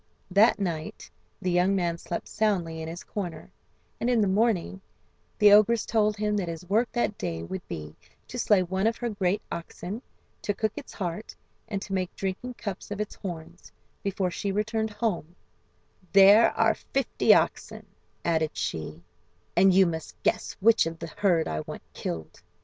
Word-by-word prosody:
That 205 Hz, +5 st, +5 dB
night 170 Hz, -6 st, -4 dB, 0.3 s
the 180 Hz, -, +1 dB
young 180 Hz, +3 st, +3 dB
man 170 Hz, -3 st, 0 dB
slept 170 Hz, -, -5 dB
soundly 175 Hz, -7 st, 0 dB
in 160 Hz, -, -5 dB
his 170 Hz, +2 st, -7 dB
corner, 175 Hz, -6 st, -6 dB, 0.5 s
and 240 Hz, -, 0 dB
in 245 Hz, -2 st, +3 dB
the 205 Hz, -, +3 dB
morning 195 Hz, -2 st, +1 dB, 0.6 s
the 210 Hz, -2 st, +7 dB
ogress 215 Hz, +2 st, +5 dB
told 215 Hz, -2 st, +1 dB
him 210 Hz, 0 st, 0 dB
that 190 Hz, -4 st, -1 dB
his 165 Hz, +1 st, -6 dB
work 225 Hz, +5 st, +2 dB
that 240 Hz, -4 st, -1 dB
day 80 Hz, -1 st, -3 dB
would 185 Hz, -, -5 dB
be 75 Hz, 0 st, -7 dB, 0.3 s
to 245 Hz, -, -6 dB
slay 205 Hz, -4 st, +4 dB
one 190 Hz, +3 st, 0 dB
of 225 Hz, -, 0 dB
her 240 Hz, -, -2 dB
great 195 Hz, -1 st, 0 dB
oxen, 175 Hz, +5 st, -6 dB, 0.4 s
to 205 Hz, -, -1 dB
cook 220 Hz, +1 st, 0 dB
its 295 Hz, -, -8 dB
heart, 180 Hz, +2 st, -5 dB, 0.3 s
and 200 Hz, -2 st, -3 dB
to 195 Hz, -, -6 dB
make 185 Hz, -2 st, -2 dB
drinking 195 Hz, +6 st, -4 dB
cups 200 Hz, -5 st, -6 dB
of 205 Hz, 0 st, -5 dB
its 210 Hz, -, -3 dB
horns, 170 Hz, -2 st, -8 dB, 0.3 s
before 195 Hz, -2 st, -1 dB
she 200 Hz, +3 st, -2 dB
returned 215 Hz, +2 st, -1 dB
home 195 Hz, -6 st, -2 dB, 0.8 s
"There 200 Hz, +3 st, +8 dB
are -, -, +4 dB
fifty 270 Hz, 0 st, +1 dB
oxen," -, -, -1 dB, 0.4 s
added 160 Hz, -2 st, 0 dB
she, 80 Hz, +1 st, -4 dB, 0.5 s
"and 190 Hz, +2 st, +6 dB
you 190 Hz, +1 st, +6 dB
must 160 Hz, -2 st, -4 dB
guess 220 Hz, -, 0 dB
which 225 Hz, -4 st, +5 dB
of 165 Hz, 0 st, -5 dB
the 165 Hz, -1 st, -7 dB
herd 180 Hz, -6 st, +2 dB
I 75 Hz, -, -2 dB
want -, -, -7 dB
killed. 80 Hz, -1 st, -6 dB
195 Hz, 170 wpm, -27 LUFS, 170-215 Hz, 0.8 s, There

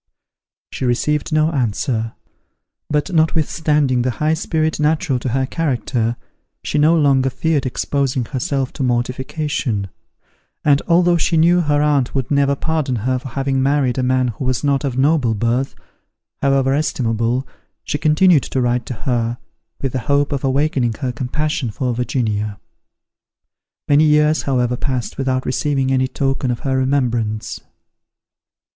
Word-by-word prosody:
She -, -, -5 dB
received 140 Hz, +4 st, 0 dB
no 155 Hz, +1 st, +2 dB
answer; 115 Hz, -3 st, -1 dB, 0.8 s
but 150 Hz, +5 st, -1 dB
notwithstanding 155 Hz, -4 st, +2 dB
the 125 Hz, -, 0 dB
high 155 Hz, +1 st, +1 dB
spirit 160 Hz, -1 st, -1 dB
natural 150 Hz, -2 st, +1 dB
to 125 Hz, -, -3 dB
her 130 Hz, +2 st, 0 dB
character, 125 Hz, -6 st, -1 dB, 0.5 s
she 150 Hz, -, -1 dB
no 160 Hz, +3 st, +4 dB
longer 135 Hz, -3 st, +3 dB
feared 145 Hz, +1 st, 0 dB
exposing 130 Hz, -1 st, -1 dB
herself 135 Hz, +2 st, -2 dB
to -, -, -6 dB
mortification; 125 Hz, -, -1 dB, 0.8 s
and, 145 Hz, -2 st, +4 dB
although 175 Hz, 0 st, +4 dB
she 165 Hz, +1 st, +1 dB
knew 175 Hz, +2 st, +4 dB
her 145 Hz, -2 st, +1 dB
aunt 140 Hz, -4 st, +1 dB
would 135 Hz, -1 st, -2 dB
never 140 Hz, -1 st, +3 dB
pardon 155 Hz, -3 st, -1 dB
her 130 Hz, 0 st, +1 dB
for 130 Hz, -, -9 dB
having 135 Hz, +1 st, -1 dB
married 135 Hz, -2 st, +1 dB
a -, -, +2 dB
man 130 Hz, 0 st, +1 dB
who 120 Hz, +4 st, -5 dB
was 130 Hz, +1 st, -1 dB
not 140 Hz, -1 st, +1 dB
of 130 Hz, -3 st, -2 dB
noble 135 Hz, -5 st, +2 dB
birth, 120 Hz, +5 st, -1 dB, 0.7 s
however 135 Hz, -1 st, +2 dB
estimable, 125 Hz, -3 st, 0 dB, 0.4 s
she 145 Hz, -, -3 dB
continued 155 Hz, 0 st, +4 dB
to 130 Hz, -, -3 dB
write 120 Hz, -1 st, 0 dB
to -, -, -3 dB
her, 120 Hz, -2 st, 0 dB, 0.5 s
with 135 Hz, -, 0 dB
the 130 Hz, -, -2 dB
hope 145 Hz, +1 st, +2 dB
of 140 Hz, -2 st, -2 dB
awakening 135 Hz, -3 st, +1 dB
her 130 Hz, -2 st, -1 dB
compassion 135 Hz, +2 st, -2 dB
for 125 Hz, +3 st, -2 dB
Virginia. 110 Hz, -4 st, -2 dB, 1.3 s
Many 145 Hz, +2 st, +5 dB
years, 150 Hz, +1 st, +3 dB
however 125 Hz, -2 st, 0 dB
passed 130 Hz, -2 st, -3 dB
without 130 Hz, -1 st, 0 dB
receiving 135 Hz, 0 st, 0 dB
any 130 Hz, 0 st, +2 dB
token 135 Hz, 0 st, -1 dB
of 120 Hz, -, -2 dB
her 135 Hz, -3 st, -1 dB
remembrance. 120 Hz, -5 st, -1 dB
135 Hz, 145 wpm, -19 LUFS, 125-150 Hz, 1.3 s, Many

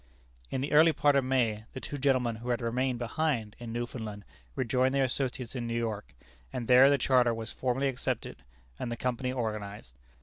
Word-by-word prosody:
In 130 Hz, -, -2 dB
the 140 Hz, -, -3 dB
early 155 Hz, +2 st, +6 dB
part 145 Hz, -1 st, +3 dB
of 140 Hz, -, +4 dB
May, 115 Hz, -5 st, +1 dB
the -, -, -5 dB
two 145 Hz, +2 st, -6 dB
gentlemen 130 Hz, -4 st, +2 dB
who 120 Hz, +2 st, -7 dB
had 120 Hz, -, +1 dB
remained 125 Hz, +2 st, 0 dB
behind 120 Hz, -3 st, -1 dB
in 120 Hz, -1 st, -6 dB
Newfoundland 115 Hz, -3 st, -5 dB, 0.3 s
rejoined 130 Hz, +2 st, +1 dB
their 135 Hz, -, +3 dB
associates 130 Hz, -1 st, -2 dB
in 120 Hz, -2 st, -3 dB
New 115 Hz, 0 st, -1 dB
York, 110 Hz, -, -3 dB, 0.4 s
and 120 Hz, -3 st, -4 dB
there 130 Hz, +2 st, +8 dB
the 140 Hz, -, +4 dB
charter 125 Hz, -2 st, +3 dB
was 110 Hz, -1 st, -6 dB
formally 130 Hz, +2 st, 0 dB
accepted 130 Hz, -2 st, -3 dB, 0.4 s
and 120 Hz, -, -3 dB
the 120 Hz, -, -3 dB
Company 125 Hz, 0 st, -1 dB
organized. 105 Hz, -, -4 dB
125 Hz, 190 wpm, -30 LUFS, 115-130 Hz, 0.4 s, there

